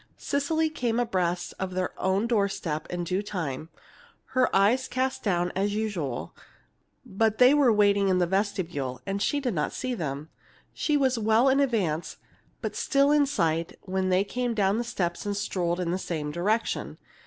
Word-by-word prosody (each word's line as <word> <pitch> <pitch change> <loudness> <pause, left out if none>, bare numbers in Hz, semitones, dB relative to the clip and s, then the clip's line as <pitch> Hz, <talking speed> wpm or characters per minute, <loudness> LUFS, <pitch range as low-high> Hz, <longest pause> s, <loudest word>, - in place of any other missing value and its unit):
Cecily 315 +3 0
came 240 -5 -1
abreast 180 -7 -1
of 185 -1 -3
their 185 0 -1
own 190 +3 +1
door 215 -4 +2
step 155 -5 -4
in 175 0 -3
due 185 +3 -1
time, 160 -7 -4 0.6
her 255 -1 +3
eyes 225 +7 +3
cast 260 +1 -1
down 175 -3 0
as 200 +2 0
usual; 185 - -3 0.7
but 220 +2 0
they 250 +2 +7
were 285 -5 +5
waiting 200 -2 +3
in 185 - +3
the 180 - +3
vestibule, 175 -9 -2
and 195 0 -2
she 290 +6 +1
did 255 -5 -1
not 150 -3 -1
see 255 -1 -3
them. 150 - -4 0.4
She 300 -2 +1
was 260 -4 +2
well 220 +4 +4
in 270 +1 +3
advance, 200 - 0 0.4
but - - -4
still 280 0 +2
in 295 -1 +4
sight, 165 - -1
when 190 0 -1
they 185 +1 +3
came 245 +3 -2
down 200 +1 +2
the - - 0
steps 180 -8 -2
and 205 -1 -1
strolled 175 -3 -1
in 175 -2 -1
the 185 - -1
same 155 -5 -3
direction. 210 +8 -1
200 Hz, 175 wpm, -27 LUFS, 175-240 Hz, 0.7 s, they